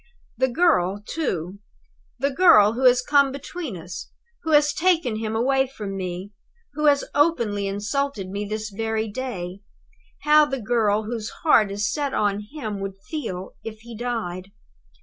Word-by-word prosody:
"The 260 - +2
girl, 220 - +2
too 190 - -3 0.6
the 280 +2 0
girl 265 - +6
who 255 +3 -1
has 250 0 +6
come 280 0 +4
between 280 - -6
us; 175 +1 -8 0.3
who 320 - -5
has 295 -1 +4
taken 330 -10 +1
him 220 0 -3
away 265 +3 +2
from 210 -7 -6
me; 185 +1 -5 0.4
who 300 +1 -2
has 285 -1 +4
openly 235 -10 +1
insulted 205 +2 -2
me 200 +2 -4
this 215 +1 -4
very 220 +1 -2
day 200 -6 -5 0.6
how 300 0 +6
the 270 -2 -3
girl 215 -2 +1
whose 220 0 -4
heart 225 -10 +5
is 205 +2 -1
set 285 -2 -2
on 205 0 0
him 220 -10 -5
would 195 0 -5
feel 190 - -4
it 225 - -5
if 215 - -25
he 235 0 -10
died! 210 -6 -4
225 Hz, 160 wpm, -24 LUFS, 200-280 Hz, 0.6 s, girl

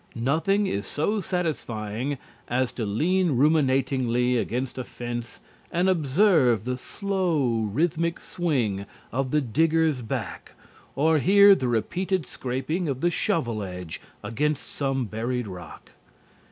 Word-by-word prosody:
Nothing 165 - +1
is 100 - -2
so 205 +8 0
satisfying 140 - -2 0.3
as 125 0 0
to 115 -4 -4
lean 170 - +1
ruminatingly 130 -4 +2
against 125 +2 -2
a - - -2
fence 120 -1 -6 0.3
and 175 +2 +1
observe 155 - +3
the 125 +2 -2
slow, 150 - -1
rhythmic 165 - 0
swing 120 - -1 0.2
of 130 +1 -1
the 150 +2 +2
digger's 155 +2 +2
back 115 - -5 0.4
or 155 +2 +3
hear 200 +5 +7
the 130 -9 0
repeated 170 - 0
scraping 140 +9 -3
of 135 -1 -3
the 175 - +2
shovel 120 -10 0
edge 90 -4 -6 0.2
against 150 +4 -1
some 135 -2 -1
buried 120 +3 -2
rock. 90 -4 -10
135 Hz, 125 wpm, -25 LUFS, 120-165 Hz, 0.4 s, hear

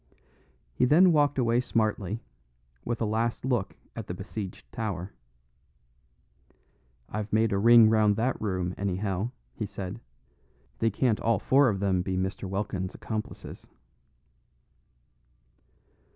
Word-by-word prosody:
He 95 - +2
then 170 +7 +6
walked 145 -3 +3
away 120 -2 +2
smartly, 110 -3 -1 0.6
with 120 - -3
a - - +2
last 115 +3 -1
look 120 -7 -1 0.2
at 115 -3 -6
the 90 - -4
besieged 95 0 -7
tower. 100 -5 -4 1.9
"I've 105 0 -5
made 110 +1 +3
a 100 - +1
ring 115 +1 +8
round 110 -2 +4
that 120 +4 -1
room, 90 -4 -1
anyhow," 100 +2 -1 0.2
he 105 - -4
said. 95 +3 -6 0.8
"They 115 - +3
can't 110 +1 +1
all 115 -1 +2
four 130 +6 +4
of 100 -3 -2
them 95 -2 +2
be 95 0 -2
Mr. 95 +1 -3
Welkin's 95 -1 -3
accomplices." 110 -1 -6
110 Hz, 125 wpm, -28 LUFS, 95-115 Hz, 1.9 s, ring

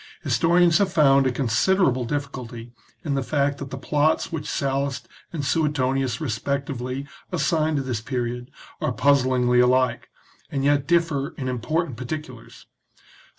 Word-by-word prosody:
Historians 175 +1 +3
have 200 -2 +2
found 140 -5 +4
a - - +1
considerable 130 - +2
difficulty 125 -4 -5 0.3
in 145 - 0
the 135 - 0
fact 140 0 0
that 140 - -6
the 135 - -6
plots 150 +3 +1
which 150 -2 -4
Sallust 140 0 -2 0.2
and 150 -4 -4
Suetonius 135 -4 0
respectively 135 +2 -3 0.2
assign 160 -3 +1
to 140 - 0
this 125 -4 -3
period 125 0 -3 0.3
are 155 - 0
puzzlingly 125 -1 +3
alike, 125 +1 +2 0.4
and 135 -2 -2
yet 145 -1 +2
differ 165 -3 +1
in 135 - -4
impor 130 +7 -1
tant 130 -8 -9
particulars. 130 -1 -7
140 Hz, 140 wpm, -24 LUFS, 125-150 Hz, 0.4 s, found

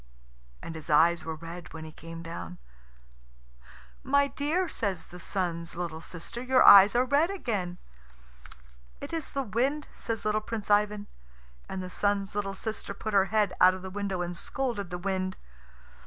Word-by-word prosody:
And - - -6
his 160 0 -9
eyes 165 +2 +4
were 160 -1 -3
red 170 +1 -9
when 160 -1 -7
he 155 - -9
came 165 +1 -9
down. 90 - -7 1.4
"My 280 +1 +3
dear," 305 +7 0
says 195 - -2
the 180 - -12
Sun's 170 -3 -3
little 165 -2 -4
sister, 180 +9 -7
"your 255 0 +4
eyes 200 +2 +9
are 250 +1 +4
red 285 +6 +3
again." 205 - -3 1.2
"It - - -7
is 325 -3 -3
the 275 - -2
wind," 260 +7 0
says 225 -2 -4
little 215 0 +1
Prince 215 -1 -4
Ivan. 205 0 +2 0.6
And 190 -1 -4
the 180 - -6
Sun's 200 0 0
little 195 -1 -2
sister 215 -1 -5
put 215 +1 -4
her 195 -1 +5
head 210 -2 +1
out 185 0 +7
of 185 - -9
the 190 - -6
window 195 -2 -2
and 175 0 -4
scolded 230 -2 -3
the 180 - -4
wind. 185 0 -2
195 Hz, 170 wpm, -29 LUFS, 175-225 Hz, 1.4 s, eyes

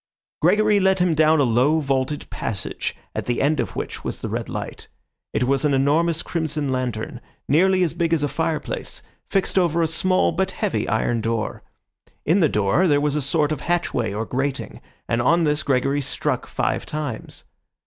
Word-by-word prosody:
Gregory 210 -1 +4
led 190 0 +3
him 180 -2 +2
down 155 0 +4
a - - +5
low, 130 +6 +3
vaulted 135 0 -1
passage, 105 -5 -4 0.2
at - - -4
the 120 - 0
end 150 +2 +2
of - - -2
which - - -5
was - - -3
the - - -3
red - - -3
light. - - -6 0.4
It - - 0
was 135 +3 +1
an 145 -2 +3
enormous 155 +5 +2
crimson 155 -4 -2
lantern, 125 -2 -3 0.3
nearly 185 +5 +4
as 170 - 0
big 170 -1 0
as 160 -3 +2
a - - +2
fireplace, 160 +1 -3 0.3
fixed 195 0 +1
over 170 -2 +1
a 165 - +3
small 185 +3 +2
but 190 +3 0
heavy 110 -2 -1
iron 115 +1 +1
door. 115 0 -2 0.6
In 170 +6 +3
the 160 -5 +4
door 105 - +2
there 145 -3 +4
was 145 0 0
a 150 - +1
sort 150 +2 +1
of 155 - -2
hatchway 170 -11 0
or 110 +3 -3
grating, 135 +3 -3 0.3
and 115 +1 +1
on 170 +7 +3
this 150 -1 +1
Gregory 140 +1 +1
struck - - -2
five - - -1
times. 150 -7 -5
150 Hz, 185 wpm, -22 LUFS, 130-165 Hz, 0.6 s, a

